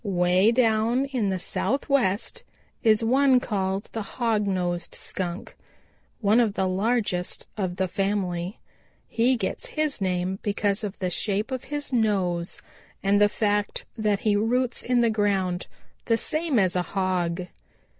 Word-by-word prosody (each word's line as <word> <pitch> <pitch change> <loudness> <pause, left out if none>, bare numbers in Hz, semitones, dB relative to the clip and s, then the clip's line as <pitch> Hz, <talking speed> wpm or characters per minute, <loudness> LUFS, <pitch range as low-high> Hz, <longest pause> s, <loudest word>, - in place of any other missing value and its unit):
Way 185 +1 +3
down 235 +1 +2
in 250 -7 -1
the 190 - 0
Southwest 250 0 0 0.4
is 220 0 +4
one 260 +2 +4
called 195 -3 -1
the 225 - -3
Hog 220 -1 -1
nosed 175 -2 -2
Skunk, 175 -1 -5 0.7
one 215 +2 +4
of 220 -4 +2
the 190 - +1
largest 195 -1 -1
of 185 -4 -2
the 190 0 0
family. 190 -1 -2 0.5
He 245 +3 +2
gets 195 -4 -3
his 305 -7 0
name 185 0 -1
because 205 0 0
of 205 -1 -4
the 185 -2 -2
shape 210 +6 -1
of 260 -1 -4
his 290 -2 -5
nose 190 -7 0 0.4
and 200 +1 +3
the 205 - +6
fact 205 -1 0
that 210 -3 0
he 210 -2 +2
roots 240 +4 +1
in 245 0 +2
the 230 -1 +3
ground 195 -4 0 0.4
the 230 - +2
same 310 +1 0
as 185 -4 +2
a 180 - +2 0.2
hog. 180 -2 0
205 Hz, 145 wpm, -25 LUFS, 185-230 Hz, 0.7 s, the